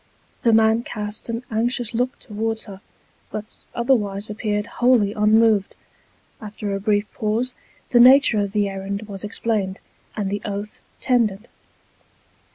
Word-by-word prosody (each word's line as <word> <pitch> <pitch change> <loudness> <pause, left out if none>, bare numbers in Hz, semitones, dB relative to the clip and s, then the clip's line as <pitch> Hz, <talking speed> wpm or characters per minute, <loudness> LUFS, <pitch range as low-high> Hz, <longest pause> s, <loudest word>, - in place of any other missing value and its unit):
The 230 - +3
man 220 +1 +4
cast 210 -1 -6
an 230 +1 -3
anxious 235 +1 0
look 250 +3 -1
towards 220 0 -4
her, 195 -2 -11 0.5
but 215 +1 -7 0.2
otherwise 215 -5 0
appeared 210 -1 -2
wholly 240 -4 +2
unmoved. 215 -1 +3 0.7
After 210 -1 -5
a 195 - -2
brief 205 0 +1
pause 225 +4 -1 0.4
the 240 - +5
nature 255 -2 +7
of 200 -1 -2
the 205 -1 +1
errand 195 +1 -4
was 200 -2 -7
explained, 210 -2 -1 0.4
and 200 -2 -2
the 205 0 -2
oath 205 +1 -5 0.2
tendered. 230 -4 +1
215 Hz, 135 wpm, -22 LUFS, 205-230 Hz, 0.7 s, nature